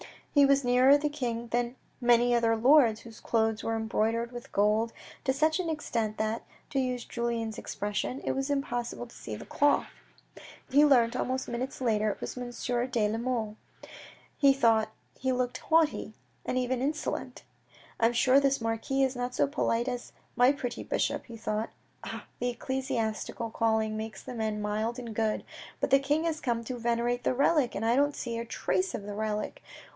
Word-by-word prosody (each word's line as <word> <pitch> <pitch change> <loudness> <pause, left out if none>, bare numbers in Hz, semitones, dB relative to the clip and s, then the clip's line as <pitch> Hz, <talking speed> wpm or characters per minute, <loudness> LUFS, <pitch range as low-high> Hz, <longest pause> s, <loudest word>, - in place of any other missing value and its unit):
He 285 -1 +7
was 275 0 +4
nearer 250 +3 +6
the 295 +1 -1
king 240 -5 -3
than 240 +1 -1 0.2
many 240 0 +4
other 230 -1 +3
lords, 240 -2 +5
whose 230 -1 -12
clothes 225 -1 0
were 225 - -1
embroidered 225 +1 0
with 240 -1 -9
gold 215 +3 +2 0.3
to 265 - +2
such 310 +5 +2
an 350 -3 -1
extent 230 -8 -2
that, 220 +1 -1 0.3
to 275 - +1
use 250 -2 -1
Julien's 235 -2 -3
expression, 210 +5 -3
it - - 0
was 270 +1 -2
impossible 245 -4 -2
to 235 - -16
see 110 - -6
the - - -9
cloth. 290 0 +2 0.8
He 290 +3 +6
learnt 245 -5 +5
some 255 0 -2
minutes 255 +3 -4
later 215 -3 +2
that 210 - 0
it - - -25
was - - -5
Monsieur 245 0 -2
de 230 -5 +1
la 220 - -1
Mole. 230 -3 -2 0.8
He 280 -1 +6
thought 225 -5 +3 0.3
he 260 0 +1
looked 250 -1 -1
haughty, 320 -1 +1 0.3
and 255 - -1
even 250 0 0
insolent. 300 +3 -3 0.3
" - - -25
I'm 230 +1 +3
sure 255 +3 +5
this 275 -2 +1
marquis 225 +4 0
is 260 -1 +1
not 245 0 -3
so - - +3
polite 255 -4 0
as 245 -1 -5 0.2
my 250 +1 +6
pretty 245 -4 -4
bishop," - - -1
he 230 -1 -10
thought. 215 0 -2 0.2
" - - -38
Ah, - - -6
the 245 - 0
ecclesiastical 235 -2 -3
calling 220 -1 +1
makes 220 -2 -6
men 220 -3 -3
mild 215 +3 -1
and 235 -3 -6
good. 220 0 0 0.4
But - - +1
the 275 - +7
king 290 +3 +1
has 325 -2 -1
come 235 -3 -1
to 245 +2 -5
venerate 235 +1 0
the - - +2
relic, 280 -1 +3
and 210 - -2
I 230 +1 +3
don't 290 +1 +2
see 235 -2 -4
a 235 - -4
trace 370 +9 -1
of 205 - -5
the 205 0 -6
relic. 210 0 -3
240 Hz, 190 wpm, -29 LUFS, 225-265 Hz, 0.8 s, He